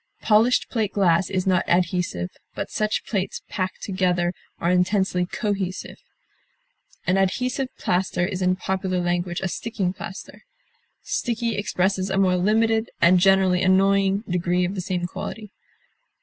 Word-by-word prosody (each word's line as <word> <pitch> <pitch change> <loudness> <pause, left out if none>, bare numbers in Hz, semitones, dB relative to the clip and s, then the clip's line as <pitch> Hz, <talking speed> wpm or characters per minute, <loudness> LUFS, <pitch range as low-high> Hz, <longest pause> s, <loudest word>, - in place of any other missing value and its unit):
Polished 225 +3 +4
plate 220 -4 -2
glass 180 -3 +2
is 185 -1 -1
not 185 -1 +2
adhesive, 175 - 0 0.2
but - - -4
such 215 0 -1
plates 195 -3 -3
packed 185 -1 -3
together 180 -2 0 0.3
are 170 - +1
intensely 180 0 +1
cohesive. 195 -1 -3 1.1
An 185 - +2
adhesive 255 +8 0
plaster 180 -1 0
is 190 -1 -4
in 185 0 +2
popular 190 -1 -2
language 175 0 -1
a 190 - -1
sticking 195 -2 -2
plaster. 190 +1 -9 0.6
Sticky 235 -1 -1
expresses 190 -1 0
a 190 - -1
more 185 -2 +3
limited, 220 +4 +2
and 180 +2 +5
generally 190 -1 +4
annoying, 195 +1 +3
degree 180 0 +1
of 180 - -3
the 190 - -3
same 180 -1 -2
quality. 210 +4 -6
190 Hz, 135 wpm, -23 LUFS, 180-200 Hz, 1.1 s, and